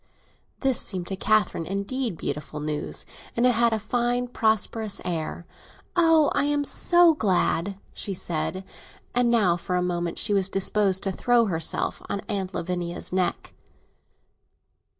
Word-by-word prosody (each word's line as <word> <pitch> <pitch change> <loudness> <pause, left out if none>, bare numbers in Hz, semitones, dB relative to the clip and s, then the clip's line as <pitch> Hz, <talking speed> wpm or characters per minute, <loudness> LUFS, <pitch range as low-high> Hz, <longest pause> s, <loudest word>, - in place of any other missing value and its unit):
This 265 -3 +3
seemed 185 -4 -2
to 195 - -2
Catherine 210 -4 +1
indeed 200 +2 -2
beautiful 150 +1 -4
news; 150 0 -4 0.3
it 235 - +2
had 235 -1 +4
a 220 - +1
fine 245 +3 -1
prosperous 220 -2 0
air. 170 -1 -3 0.5
"Oh, 325 -3 +4
I'm 290 0 +1
so 345 +3 +5
glad!" 195 - 0 0.2
she 195 - -4
said; 180 +3 -2 0.5
and 245 0 +2
now, 205 -8 +3
for 180 +1 -3
a 180 - +1
moment, 175 -1 -2
she 205 - +2
was 195 -1 +2
disposed 195 0 +1
to 195 - 0
throw 240 +4 +3
herself 165 -5 -1
on 200 - -2
Aunt 195 -3 -4
Lavinia's 175 0 -3
neck. 185 -2 -1
200 Hz, 135 wpm, -25 LUFS, 180-235 Hz, 0.5 s, so